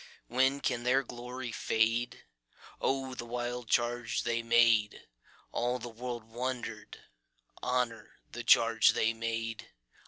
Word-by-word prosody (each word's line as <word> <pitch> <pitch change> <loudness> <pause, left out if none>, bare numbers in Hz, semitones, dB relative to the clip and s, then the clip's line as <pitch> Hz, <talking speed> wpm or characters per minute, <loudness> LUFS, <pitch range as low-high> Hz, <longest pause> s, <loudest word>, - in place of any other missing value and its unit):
When 130 +3 +2
can 120 - 0
their 130 +3 +3
glory 125 0 -6
fade?O 115 - -2
the 125 - -5
wild 120 0 -4
charge 120 -1 +1
they 115 0 0
made! 115 -3 +3 0.5
All 120 +1 0
the 120 - -7
world 120 0 -5
wonder'd. 120 +2 -5 0.6
Honor 120 -4 -2
the 120 - -6
charge 115 -1 +5
they 115 +1 +2
made! 115 0 -4
120 Hz, 115 wpm, -31 LUFS, 115-125 Hz, 0.6 s, charge